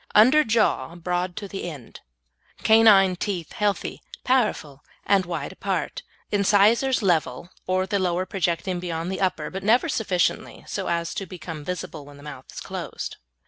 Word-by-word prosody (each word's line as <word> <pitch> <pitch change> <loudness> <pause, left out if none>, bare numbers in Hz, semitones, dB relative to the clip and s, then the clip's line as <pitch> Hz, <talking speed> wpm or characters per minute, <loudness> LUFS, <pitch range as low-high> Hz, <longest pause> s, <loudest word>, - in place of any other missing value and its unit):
Under 255 +9 +7
jaw 220 - +1
broad 180 +1 -2
to 205 - -5
the 195 -2 -5
end; 140 -8 -11 0.6
canine 210 -4 +6
teeth 180 -3 -4
healthy, 210 -3 -1 0.2
powerful, 210 - 0 0.2
and 195 -3 +3
wide 170 0 -4
apart; 190 -4 -3 0.3
incisors 210 +5 +3
level, 170 -3 0 0.2
or 185 0 +1
the 200 +1 -1
lower 180 0 0
projecting 180 -1 -1
beyond 170 0 -3
the 190 - -4
upper, 160 -5 -1
but 190 - -5
never 235 +10 +4
sufficiently 195 - -1
so - - -3
as 170 -1 -1
to 195 - -4
become 165 -4 -7
visible 180 -3 -5
when 145 0 -14
the 145 - -14
mouth 140 -3 -9
is - - -8
closed. - - -6
185 Hz, 155 wpm, -24 LUFS, 170-205 Hz, 0.6 s, Under